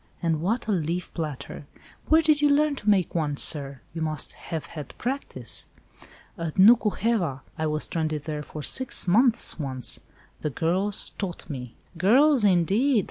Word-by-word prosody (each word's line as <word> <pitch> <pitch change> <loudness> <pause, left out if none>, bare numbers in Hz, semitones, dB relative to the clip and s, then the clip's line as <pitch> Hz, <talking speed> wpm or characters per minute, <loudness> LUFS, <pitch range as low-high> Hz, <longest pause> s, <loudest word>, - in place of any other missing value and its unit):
And 165 -3 -1
what 225 +8 -1
a - - 0
leaf 175 -1 -2
platter! 150 -3 -6 0.4
Where 320 +1 +5
did 305 -2 +3
you 295 - +4
learn 295 +1 +3
to 210 - -2
make 190 -4 +2
one, 150 -4 -1
sir? 140 -3 -6
you 165 - -5
must 155 -2 -1
have 160 -4 -6
had 150 -5 -9
practice." 270 +4 -4 0.7
"At 165 -2 -4
Nuku 210 +1 +6
heva! 185 - -1
I 160 -1 -2
was 155 0 -1
stranded 155 -3 -2
there 150 -1 -4
for 150 0 -8
six 260 - +3
months 230 +1 +3
once. 130 -4 -3 0.4
The 150 - -2
girls 185 +8 +2
taught 185 -4 -6
me." 125 -4 -7 0.2
"Girls, 260 - +4
indeed! 205 - +3
175 Hz, 160 wpm, -25 LUFS, 155-230 Hz, 0.7 s, Nuku